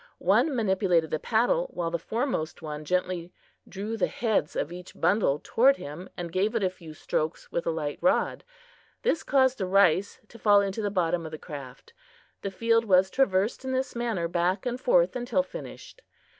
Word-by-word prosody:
One 305 -4 +2
manipulated 190 -7 +1
the 155 - 0
paddle, 245 - +1
while 170 -1 -2
the 170 - -1
foremost 225 - -3
one 150 -1 -5
gently 180 0 -1 0.4
drew 210 +4 -4
the 195 - +2
heads 215 -10 -1
of 155 - -2
each 180 +1 -10
bundle 175 -5 +2
toward 270 +4 +4
him 155 +6 -8
and 175 -1 -5
gave 200 +6 0
it 225 - +1
a 185 - +1
few 165 -4 -12
strokes 155 +1 -3
with 170 - -2
a - - +3
light 155 -3 -3
rod. 275 - +1 0.6
This 390 -9 +1
caused 260 -2 +2
the 190 - -1
rice 195 +2 +3
to 230 - -14
fall 205 -1 +5
into 200 +2 -1
the 205 - 0
bottom 175 -3 0
of 160 - -7
the 155 - -6
craft. 140 -6 -10 0.5
The 195 - -3
field 230 +3 +2
was 190 -2 +4
traversed 210 -3 +1
in 260 0 -3
this 260 0 -2
manner 230 -8 -1
back 175 +3 0
and 245 0 -3
forth - - +3
until 250 +3 0
finished. - - -10
190 Hz, 185 wpm, -27 LUFS, 170-235 Hz, 0.6 s, fall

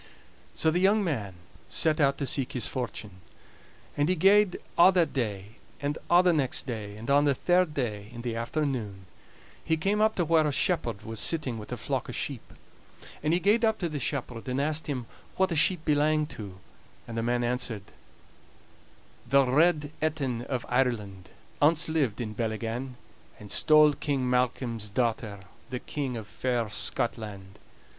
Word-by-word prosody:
So 160 - +2
the 175 - +1
young 200 +3 +4
man 110 - -3 0.3
set 155 -1 +2
out 140 -1 +3
to 140 - -2
seek 135 -1 0
his 125 - -1
fortune. 105 -6 -5 0.7
And 145 +3 +1
he 185 - +3
gaed 195 +2 +4 0.2
a' 180 +2 +7
that 175 -3 +2
day, 105 -4 -3 0.2
and 145 +1 -2
a' 175 +1 +6
the 180 -1 +4
next 140 -5 0
day; 105 -5 -5
and 115 +2 -9
on 145 +1 +5
the 140 -2 +3
third 175 +1 +2
day, 105 -6 -3
in 120 -1 -8
the 120 -2 -3
afternoon, 115 -6 -3 0.6
he 160 -1 +1
came 200 +6 +1
up 220 0 +3
to 175 - +1
where 160 -1 +3
a - - 0
shepherd 135 - 0
was 110 -1 -5
sitting 130 -4 0
with 105 - -10
a - - -3
flock - - -3
o' - - -5
sheep. - - -3 0.8
And 155 - 0
he 175 - +3
gaed 210 +5 +3
up 220 -1 +3
to 175 - -2
the 150 -2 -4
shepherd 125 -3 -3
and 130 +1 -1
asked 155 +2 -1
him 130 -5 -3 0.3
wha 190 - +4
the 180 -3 -3
sheep 165 +1 +3
belanged 150 0 +2
to; 100 -4 -8 0.5
and 115 - -7
the 115 - -1
man 120 +1 0
answered: 120 -4 -2 1.5
"The 140 +1 +5
Red 150 +2 +2
Etin 140 -6 -1
of 125 -3 -3
Ireland 105 -7 -1 0.3
Ance 150 +2 +4
lived 140 -9 0
in 110 -3 -4
Bellygan, 115 +3 -3 0.4
And 105 -1 -10
stole 155 -1 +5
King 140 -3 -1
Malcolm's 125 -3 -1
daughter, 110 -3 -1 0.3
The 125 0 -4
King 135 -3 -4
of 110 - -6
fair 120 -1 -2
Scotland. 105 -3 -2
130 Hz, 175 wpm, -28 LUFS, 115-155 Hz, 1.5 s, a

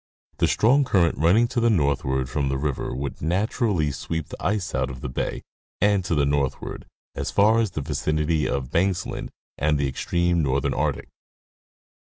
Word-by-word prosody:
The - - +4
strong 135 +6 +4
current 90 - +2
running 95 +10 +4
to 120 - -1
the 115 0 +3
northward 70 - +1
from 70 +1 -1
the 70 - 0
river 70 -1 -2
would 70 +2 -5
naturally 95 - 0
sweep 80 +4 -4
the - - -9
ice 100 -1 -1
out 65 - 0
of 65 0 -8
the - - -4
bay 65 - -3 0.4
and 100 -1 +3
to 85 - 0
the 70 -1 +3
northward, 70 -2 -2 0.3
as - - -3
far 110 +3 +4
as 110 -2 +1
the 75 - -4
vicinity 75 +2 0
of 65 -1 -2
Banksland 90 +1 -1 0.3
and 75 0 +2
the 70 -1 0
extreme 85 +5 0
northern 70 -2 0
Arctic. - - -2
80 Hz, 175 wpm, -24 LUFS, 70-100 Hz, 0.4 s, The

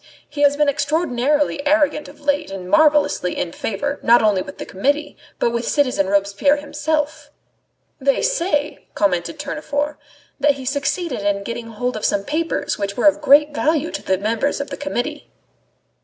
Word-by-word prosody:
He 290 0 -6
has 285 0 +4
been 300 0 +3
extraordinarily 285 -1 0
arrogant 300 0 +2
of 295 - -14
late 290 0 0
and 190 -2 -7
marvellously 290 - +3
in 170 - -2
favour, 280 +11 -3
not 235 0 +5
only 205 -3 +3
with - - -9
the - - -6
Committee, 285 +10 -1 0.2
but 235 - +1
with 235 0 -2
citizen 255 -10 +1
Robespierre 200 +8 +2
himself." 295 0 -2 0.7
"They 275 0 +1
say," 320 -11 -1
commented 180 - 0
Tournefort, 295 0 -3 0.4
"that 285 +1 +4
he 265 -2 -9
succeeded 285 - -1
in 200 0 0
getting 235 +1 -5
hold 245 +2 -3
of 215 - -5
some 200 -1 +1
papers 320 +8 -2
which 200 0 -3
were 245 - 0
of 300 0 +4
great 295 +1 +5
value 310 +1 0
to - - -5
the 190 - 0
members 225 +9 -1
of 280 - -5
the - - -3
Committee." 290 +1 -4
285 Hz, 170 wpm, -20 LUFS, 225-295 Hz, 0.7 s, not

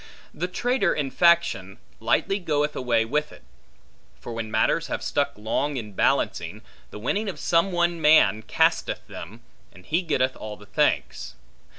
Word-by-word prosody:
The 175 +4 -3
traitor 235 +1 0
in 140 -3 -2
faction, 165 - +2 0.2
lightly 155 - +1
goeth 150 -4 -1
away 120 -3 +1
with 150 +5 -1
it; - - -15 0.8
for 120 - -7
when 115 -1 -4
matters 110 0 +1
have - - -4
stuck - - 0
long 130 +7 -2
in 110 -4 -6
balancing, - - 0 0.3
the - - -9
winning 200 - -1
of 190 - -6
some 170 +3 +2
one 175 -1 0
man 130 -9 +5
casteth - - 0
them, 115 +3 -10 0.3
and 95 -2 -17
he 165 +4 +1
getteth 130 -7 0
all 105 -1 -7
the 105 - -15
thanks. 100 - -1
145 Hz, 160 wpm, -25 LUFS, 110-170 Hz, 0.8 s, man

